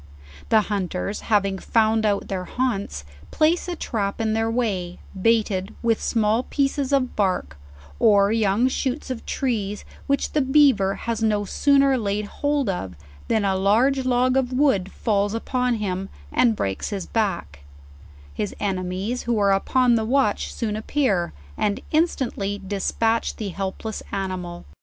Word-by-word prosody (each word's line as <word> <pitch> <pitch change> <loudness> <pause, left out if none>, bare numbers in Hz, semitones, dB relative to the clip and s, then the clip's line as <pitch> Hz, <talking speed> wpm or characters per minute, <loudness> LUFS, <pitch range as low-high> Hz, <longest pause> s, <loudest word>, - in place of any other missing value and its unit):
The 220 - +5
hunters 195 -1 -3
having 195 -3 +2
found 220 0 +2
out 200 -1 0
their 185 -2 -3
haunts, 200 - -2 0.3
place 325 +4 +2
a 355 - -3
trap 205 -10 -3
in 220 -1 0
their 225 0 +1
way, 200 -7 -1 0.2
baited 210 -3 +1
with 230 -1 +2
small 220 0 +2
pieces 275 0 -1
of 270 -3 +1
bark, 185 - 0 0.4
or 200 -1 +5
young 220 +2 +2
shoots 260 +1 -2
of 250 - -5
trees, 210 -6 -2 0.2
which 280 0 0
the 300 - +2
beaver 265 -8 +4
has 230 -1 -3
no 210 -2 +1
sooner 275 +3 +3
laid 205 -1 -1
hold 285 +4 -1
of, 95 - -3 0.3
than 220 -2 +1
a 190 -1 +2
large 235 +8 +3
log 255 +1 +2
of 260 -1 0
wood 255 -9 +2
falls 205 -1 0
upon 250 +1 0
him, 195 -3 -3 0.2
and 235 -3 +3
breaks 95 - -2
his 195 -4 -4
back; 200 - -2 0.7
his 205 - -3
enemies, 190 +4 -2
who 235 - +2
are 200 -1 +3
upon 245 +5 +3
the 225 -1 +2
watch 240 -2 +1
soon 215 -3 -3
appear, 215 - 0 0.3
and 205 -1 0
instant 310 -7 0
ly 200 +1 -2
despatch 225 +3 0
the 210 -3 -4
helpless 195 +3 -4
animal. 185 -3 -4
215 Hz, 150 wpm, -23 LUFS, 195-250 Hz, 0.7 s, The